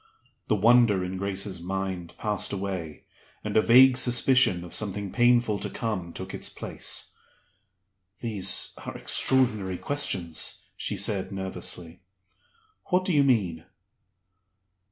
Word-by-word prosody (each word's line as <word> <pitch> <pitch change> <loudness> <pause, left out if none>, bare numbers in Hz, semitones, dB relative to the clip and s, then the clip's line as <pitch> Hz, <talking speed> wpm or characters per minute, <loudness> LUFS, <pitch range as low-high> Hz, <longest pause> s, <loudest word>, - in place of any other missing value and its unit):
The 110 - +2
wonder 110 -2 +4
in 90 +1 -4
Grace's 95 -1 -2
mind 95 -1 -4
passed 105 -2 -1
away, 95 -6 -5 0.4
and 105 -1 -4
a 110 - +6
vague 125 +3 +6
suspicion 125 -6 +3
of 90 - -11
something 100 -2 -2
painful 120 -3 +2
to - - -3
come 100 -7 -4
took - - -8
its - - -5
place. - - -4 1.0
"These 110 -5 -1
are - - -7
extraordinary 110 -8 +2
questions," 95 - -1
she - - -3
said, 95 -2 +1
nervously. 90 -3 -4 0.8
"What 185 +1 +1
do 185 - 0
you 145 -2 +4
mean?" 100 - 0
100 Hz, 120 wpm, -26 LUFS, 95-120 Hz, 1.0 s, a